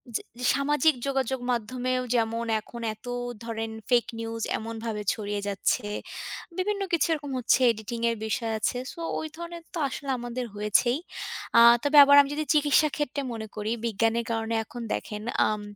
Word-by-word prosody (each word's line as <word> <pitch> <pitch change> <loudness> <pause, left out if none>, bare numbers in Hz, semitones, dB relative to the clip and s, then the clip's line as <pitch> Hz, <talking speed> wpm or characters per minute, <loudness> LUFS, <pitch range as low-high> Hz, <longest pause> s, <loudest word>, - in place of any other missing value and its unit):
চে - - +1 0.2
যে 250 - -2
সামাজিক 295 +3 +3
যোগাযোগ 265 -1 0
মাধ্যমেও 255 +2 -1
যেমন, 230 0 0 0.2
এখন 235 +2 -10
এত 215 - -19 0.4
ধরেন 225 -1 -3 0.2
fake 240 -2 +3
news 225 0 -4 0.2
এমনভাবে 225 -1 -4
ছড়িয়ে 205 -1 -3
যাচ্ছে। 200 +1 0 0.7
বিভিন্ন 400 +2 0
কিছু 340 - +3
এরকম 290 -3 -4
হচ্ছে 245 +1 +3
এডিটিং 225 +2 -6
এর 230 - -2
বিষয় 225 0 -1
আছে। 245 - 0 0.2
সো, - - -13 0.2
ওই 315 - -4
ধরনের 340 0 -7
তো - - -4
আসলে 275 +1 -6
আমাদের 240 +1 -4
হয়েছেই। 210 +6 +2 0.6
আ - - +10 0.2
তবে 290 +1 +3
আবার 285 0 +7
আমি 280 - -2
যদি 310 +1 -2
চিকিৎসা 300 0 +4
ক্ষেত্রে 290 -1 -2
মনে 220 -1 -5
করি, 215 0 -2
বিজ্ঞানের 225 +1 +1
কারণে 225 0 -1
এখন 240 +3 -8
দেখেন, 210 -1 -4 0.3
আম 215 -1 -1
235 Hz, 165 wpm, -27 LUFS, 225-280 Hz, 0.7 s, আ